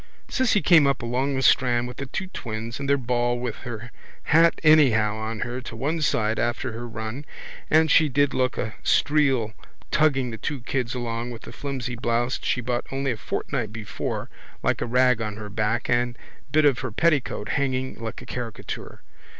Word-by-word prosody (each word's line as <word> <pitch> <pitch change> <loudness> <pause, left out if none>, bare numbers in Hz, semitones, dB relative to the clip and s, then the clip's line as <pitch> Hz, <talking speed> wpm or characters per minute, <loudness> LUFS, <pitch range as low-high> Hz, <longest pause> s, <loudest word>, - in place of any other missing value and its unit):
Cissy 245 -6 +2
came 160 -5 +6
up 140 -3 0
along 130 +4 0
the 135 - -1
strand 125 -3 +4
with 125 - -9
the 140 - -5
two 190 - -3
twins 115 - -5
and 140 0 -3
their 140 - +4
ball 120 -1 0
with 120 -2 -4
her 120 -1 -7 0.3
hat 165 +2 +4
anyhow 125 -9 +5
on 110 0 -4
her 120 +2 -3
to 120 - -8
one 150 +8 -1
side 110 -6 +1
after 120 0 -1
her 120 +2 -6
run 115 +4 -5 0.5
and 160 -1 +4
she 155 -2 +5
did 145 +1 +2
look 130 0 0
a 110 - -2
streel 135 -7 +2 0.4
tugging 135 -5 +2
the 110 - -7
two 145 -4 -3
kids 125 0 -2
along 120 -1 -3
with 115 -2 -8
the - - -9
flimsy 130 -3 -4
blouse 120 +1 0
she 125 - 0
bought 120 0 -2
only 135 0 -1
a - - -1
fortnight 110 0 -3
before 105 -3 -4 0.4
like - - +1
a - - -1
rag 125 0 +3
on 105 -2 -3
her 105 -1 -7
back 110 +2 0
and 120 0 +1
a - - -22
bit 155 0 +4
of 140 -4 +4
her - - -4
petticoat 145 -5 +1
hanging 130 -2 0
like 110 -1 -5
a - - -11
caricature. 120 -3 -6
125 Hz, 190 wpm, -25 LUFS, 115-140 Hz, 0.5 s, came